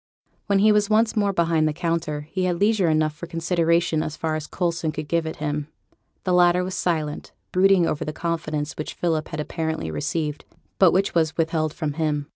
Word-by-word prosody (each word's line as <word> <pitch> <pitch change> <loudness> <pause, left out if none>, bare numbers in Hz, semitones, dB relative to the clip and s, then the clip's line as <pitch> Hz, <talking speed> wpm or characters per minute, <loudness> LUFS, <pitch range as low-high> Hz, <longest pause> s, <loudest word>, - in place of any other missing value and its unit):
When 200 -1 +3
he 210 +2 +5
was 210 0 +2
once 220 +1 +3
more 205 -2 +2
behind 165 -3 +2
the 155 - 0
counter, 165 -2 -2
he 185 -1 -1
had 175 -2 0
leisure 205 -4 +3
enough 155 -1 +2
for 170 +2 -8
consideration 165 -1 +1
as 155 0 -4
far 160 -1 -2
as 155 -1 -3
Coulson 170 -3 -1
could 155 -1 -6
give 165 +1 0
it 160 - -4
him. 150 -1 -3 0.6
The 185 - 0
latter 180 0 +4
was 185 +1 -4
silent, 160 -5 -2 0.2
brooding 185 -1 +4
over 150 - -1
the 155 - -3
confidence 155 -2 -3
which 155 - -5
Philip 160 -3 -1
had 155 - -6
apparently 160 - -3
received, 150 - -2 0.4
but 190 -3 +7
which 195 +2 +1
was 160 -1 +1
withheld 160 -1 0
from 155 -2 -3
him. 150 -2 -1
165 Hz, 200 wpm, -23 LUFS, 155-180 Hz, 0.6 s, but